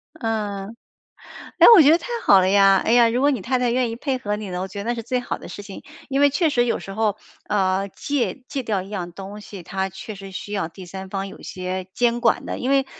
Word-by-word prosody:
嗯。 215 -5 -3 0.8
哎， - - +9
我 370 - +9
觉 290 - +6
得 330 - +6
太 - - -10 0.2
好 195 - +7
了 185 - +2
呀， 195 0 +5
哎 - - +2
呀， 240 -1 +6
如 240 +2 0
果 285 +2 +4
你 260 -8 -1
太 255 +6 0
太 245 -1 +1
愿 245 0 +1
意 225 - -4
配 265 +1 -1
合 210 -4 -3
你 210 -2 -6
的， 180 0 -3
我 190 - -3
觉 200 - -7
得 - - -8
那 240 - 0
是 230 - -5
最 250 +2 -1
好 245 - -4
的 - - -11
事 - - -7
情， 200 -1 -10 0.2
因 275 0 0
为 285 - +6
确 315 +4 +1
实 245 -4 +2
有 235 - 0
时 195 - -8
候， 215 -1 0 0.3
呃， 195 -1 +1
戒 275 +3 -2
戒 270 - -4
掉 210 -5 -1
一 190 - -10
样 180 -4 -5
东 195 +3 -9
西， 200 -2 -10
它 190 +2 -3
确 195 +3 -8
实 195 0 -10
需 205 +2 -7
要 195 -5 -2
第 185 +2 -11
三 190 +2 -8
方 195 0 -3
有 195 - -12
些 185 0 -5
监 240 0 +1
管 - - +2
的， - - -4
因 255 - -2
为 275 -1 +3
210 Hz, 285 characters per minute, -22 LUFS, 195-245 Hz, 0.8 s, 哎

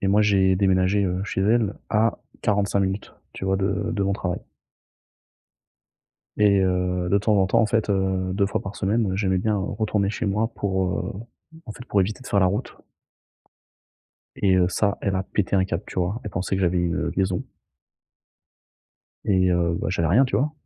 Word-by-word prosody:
Et 95 - 0
moi, 105 +2 +4
j'ai 95 -2 +3
déménagé, 95 +1 +2
heu, 90 +1 -1
chez 95 - -2
elle 110 -1 +2 0.2
à 110 +1 +2 0.2
45 100 -2 +1
minutes, 95 +1 -2 0.2
tu - - -6
vois? 95 0 +1
De 100 +3 -1
de 100 -3 -1
mon 100 0 +1
travail. 90 -3 -3 2.0
Et 100 -2 +4
heu, 90 -1 0
de 100 - +4
temps 105 +1 +2
en 95 -1 +3
temps 115 +4 +3
en 110 - +3
fait, 110 -1 0
heu, 95 -1 0
2 100 +1 +1
fois - - -2
par 95 +1 -7
semaine, 105 0 0
heu, - - -2
j'aimais 95 -2 +1
bien, 105 +3 0
heu, - - -2 0.2
retourner 105 -2 0
chez 105 - -3
moi 105 +3 0
pour, 95 -2 -1
heu, - - -4 0.5
en 110 - -6
fait, 125 - -11
pour 105 - +1
éviter 105 +6 -2
de - - -11
faire 100 - +2
la 95 - +4
route. 100 +3 -2 1.6
Et 95 -2 +3
heu, 90 -1 +4
ça, 100 +2 +1
elle 100 -1 0
a 95 - 0
pété 100 0 -1
un 95 - +3
câble, 90 +1 -3
tu - - -6
vois? 95 +7 -1
Elle 105 - -5
pensait 95 +2 -2
que - - -2
j'avais 90 0 +2
une 85 0 -1
liaison. 95 -2 0 1.8
Et 95 -2 +2
heu, 85 -1 +1
bah, - - -2
j'avais 85 -3 0
rien, 120 +10 +5
tu 100 - -1
vois? 145 +6 0
95 Hz, 200 wpm, -24 LUFS, 95-105 Hz, 2.0 s, rien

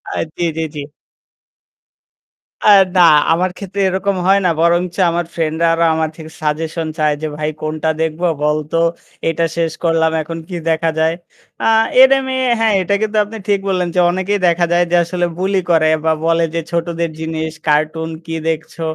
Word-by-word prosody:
আ - - -3 0.2
জ্বী, - - -3
জ্বী, 160 - -2
জ্বী। 150 - -5 1.8
আ - - +4 0.3
না, 180 - +5 0.3
আমার 180 +3 +2
ক্ষেত্রে 200 0 -5
এরকম 190 +1 -1
হয় 195 +1 +5
না। - - +4
বরঞ্চ 175 +1 +1
আমার 170 +1 -1
ফ্রেন্ড-রা 165 0 0
আরো 165 0 +1
আমার 160 0 0
থেকে 160 -1 -11
সাজেশন 155 +2 -2
চায় 150 -1 +2
যে 155 - -2
ভাই 155 0 -2
কোনটা 155 +1 -2
দেখবো 160 +2 -1 0.2
বলতো। 150 +1 0 0.5
এটা 165 +1 0
শেষ 165 -1 0
করলাম। 165 -1 +2
এখন 165 +2 -6
কি 180 - -5
দেখা 165 0 +1
যায়। 160 +1 +2 0.5
আ - - -1 0.4
এটা 265 +1 +7
আমি 265 0 -3 0.3
হ্যাঁ, 225 -1 +2
এটা 185 +2 -1
কিন্তু 220 0 -1
আপনি 215 +2 -9
ঠিক 200 -1 +2
বললেন। 185 -2 0
যে - - +3
অনেকেই 190 +3 -1
দেখা 170 0 +2
যায় 175 0 +3
যে - - +3
আসলে 175 +1 -2
বুলি 190 +1 +1
করে 160 -2 +4 0.2
বা 160 - +3
বলে 165 0 +2
যে - - +1
ছোটদের 170 0 -2
জিনিস 160 0 -3 0.2
কার্টুন 155 +2 +1 0.2
কি 165 - -6
দেখছো। 160 +1 -4
165 Hz, 175 wpm, -17 LUFS, 160-180 Hz, 1.8 s, এটা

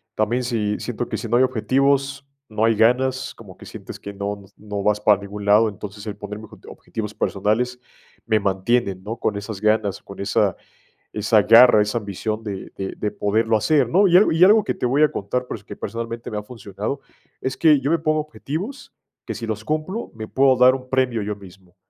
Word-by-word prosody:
también, 115 +4 0
si 110 -4 -1
siento 120 0 -4
que - - -2
si 115 - -5
no 120 - +3
hay 130 - +5
objetivos, 135 +3 +1 0.2
no 110 0 -2
hay 115 0 +3
ganas. 130 +4 +2
Como 100 -5 -14
que - - -13
sientes - - -9
que 100 - -8
no 100 0 -5
no 105 -1 -5
vas 105 0 +2
para 105 -1 +4
ningún 100 0 -7
lado. 105 +2 +5
Entonces, 105 +1 -9
el 105 - -4
ponerme 105 +1 -7
obje - - -16
objetivos 105 -2 -6
personales, 110 +7 -1 0.5
me 110 -1 +2
mantiene, 100 +2 0
¿no?, 105 +5 -6
con 110 -2 -1
esas 100 -1 -6
ganas, 110 -2 +1
con 100 - -12
esa 100 - +1 0.6
esa 105 0 +3
garra, 115 +1 +7
esa 105 +3 -1
ambición 105 +2 -4
de 100 -3 -6
de 95 0 -4
de 105 - -2
poderlo 110 +2 +1
hacer, 130 +4 +2
¿no? 190 +7 +4
Y 175 - +6
algo 195 -1 +5
y 165 - +1
algo 210 +2 +6
que - - -1
te - - -5
voy 140 +5 +2
a 150 - +3
contar, 125 +6 -3
pero - - -4
es - - -20
que - - -9
personalmente 115 0 -5
me 105 - -3
ha - - -4
funcionado, 105 +3 -6 0.4
es 130 0 -3
que 155 -3 +5
yo 140 +2 -1
me 165 - +3
pongo 155 -1 +1
objetivos, 160 - -6 0.3
que - - -4
si 115 - -6
los 110 -1 -4
cumplo, 155 - -3
me 110 -1 -6
puedo 130 -1 +3
dar 125 +1 +6
un 130 -1 -7
premio, 125 -4 +1
yo 105 0 -3
mismo. 95 -2 -16
110 Hz, 215 wpm, -22 LUFS, 105-130 Hz, 0.6 s, garra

